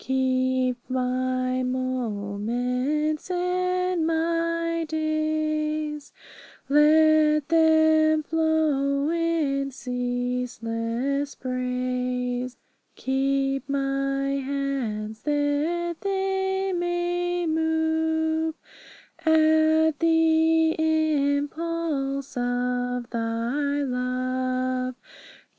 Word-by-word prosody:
Keep 260 -1 +1
my 255 0 0
moments 250 - -2
and 365 -1 0
my 335 0 0
days; 310 -1 -1 0.6
Let 305 +1 +4
them 315 -1 +4
flow 305 -3 +1
in 320 -5 0
ceaseless 250 +1 -2
praise. 250 0 -2 0.4
Keep 270 +1 -1
my 275 0 -1 0.2
hands, 250 -6 -3
that 300 +4 0
they 385 -1 -1
may 350 0 -1
move 320 0 0 0.7
At 315 -1 +4
the 325 0 +3
impulse 300 -2 0
of 245 0 -1
Thy 240 +5 -1
love. 255 0 -1
285 Hz, 60 wpm, -25 LUFS, 255-320 Hz, 0.7 s, Let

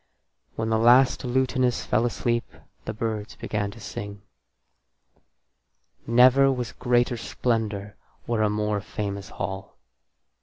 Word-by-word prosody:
When 110 0 -2
the 110 0 +2
last 125 +4 +5
lutanist 125 0 0
fell 110 +3 +2
asleep 120 0 -1 0.4
the 110 - -3
birds 110 -1 -3
began 105 -1 -3
to 115 - -12
sing. 100 -1 -7 1.8
Never 130 +3 +6
was 125 -4 -3
greater 120 -1 +1
splendour 110 -4 -2 0.3
or 115 -2 0
a 105 - +3
more 105 0 -1
famous 100 -1 -5
hall. 95 +1 -6
115 Hz, 115 wpm, -25 LUFS, 105-125 Hz, 1.8 s, Never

